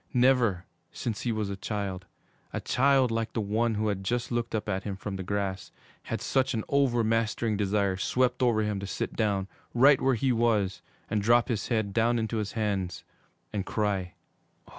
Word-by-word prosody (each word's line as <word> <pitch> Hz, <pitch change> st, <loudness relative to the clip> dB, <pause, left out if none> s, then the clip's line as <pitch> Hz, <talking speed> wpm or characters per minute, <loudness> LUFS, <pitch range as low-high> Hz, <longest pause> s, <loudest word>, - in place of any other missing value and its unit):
Never, 120 Hz, -7 st, +3 dB, 0.3 s
since 110 Hz, -3 st, -4 dB
he 120 Hz, -, -1 dB
was 110 Hz, -3 st, -2 dB
a -, -, -3 dB
child, 100 Hz, -2 st, -4 dB, 0.4 s
a -, -, -2 dB
child 135 Hz, -2 st, +3 dB
like 115 Hz, 0 st, -2 dB
the -, -, -1 dB
one 110 Hz, +2 st, 0 dB
who 105 Hz, +1 st, 0 dB
had 95 Hz, -1 st, -2 dB
just 120 Hz, +5 st, -1 dB
looked 120 Hz, -1 st, -1 dB
up 110 Hz, -, -2 dB
at 95 Hz, -, -1 dB
him 100 Hz, -2 st, -4 dB
from 95 Hz, +1 st, -5 dB
the 95 Hz, -, -4 dB
grass, 95 Hz, 0 st, -3 dB, 0.4 s
had -, -, -3 dB
such 130 Hz, -1 st, +1 dB
an 110 Hz, -, -1 dB
over 135 Hz, -4 st, +3 dB
mastering 115 Hz, 0 st, +1 dB
desire 100 Hz, -1 st, +1 dB
swept 125 Hz, +5 st, +1 dB
over 115 Hz, -4 st, +3 dB
him 105 Hz, -2 st, -1 dB
to 100 Hz, -, -5 dB
sit -, -, -3 dB
down, 100 Hz, -4 st, 0 dB, 0.3 s
right 135 Hz, +3 st, +6 dB
where 135 Hz, -1 st, +3 dB
he 130 Hz, +3 st, +1 dB
was, 105 Hz, -6 st, +1 dB, 0.3 s
and 105 Hz, -, 0 dB
drop 120 Hz, +4 st, +4 dB
his 110 Hz, -4 st, -1 dB
head 110 Hz, -5 st, 0 dB
down 115 Hz, +2 st, +2 dB
into 110 Hz, 0 st, -1 dB
his 105 Hz, -2 st, -3 dB
hands 100 Hz, -5 st, -2 dB, 0.5 s
and 100 Hz, -2 st, -1 dB
cry. 100 Hz, -4 st, -1 dB
110 Hz, 190 wpm, -28 LUFS, 100-120 Hz, 0.5 s, right